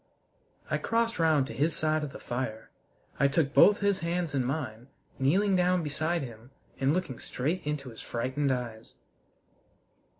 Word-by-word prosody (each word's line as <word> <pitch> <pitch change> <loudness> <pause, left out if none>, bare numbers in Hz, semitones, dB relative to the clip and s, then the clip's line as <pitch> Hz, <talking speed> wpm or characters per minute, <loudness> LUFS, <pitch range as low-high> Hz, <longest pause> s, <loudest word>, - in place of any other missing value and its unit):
I - - +1
crossed 230 -2 0
round 155 -4 +4
to 140 - -7
his 155 +3 +1
side 155 0 +1
of 145 - -4
the - - -8
fire. 120 -3 -4 0.5
I 140 - +5
took 145 0 +1
both 205 +1 +6
his 200 -1 +2
hands 170 -2 -2
in 135 -2 +1
mine, 125 -4 -3 0.3
kneeling 190 +9 +3
down 180 -1 +2
beside 155 +2 -1
him 120 -1 -10 0.3
and 135 +1 +3
looking 160 -7 -2
straight 155 +9 -2
into 145 -3 -3
his 115 - -10
frightened 130 +4 -1
eyes. 115 -3 -4
145 Hz, 160 wpm, -29 LUFS, 130-175 Hz, 0.5 s, both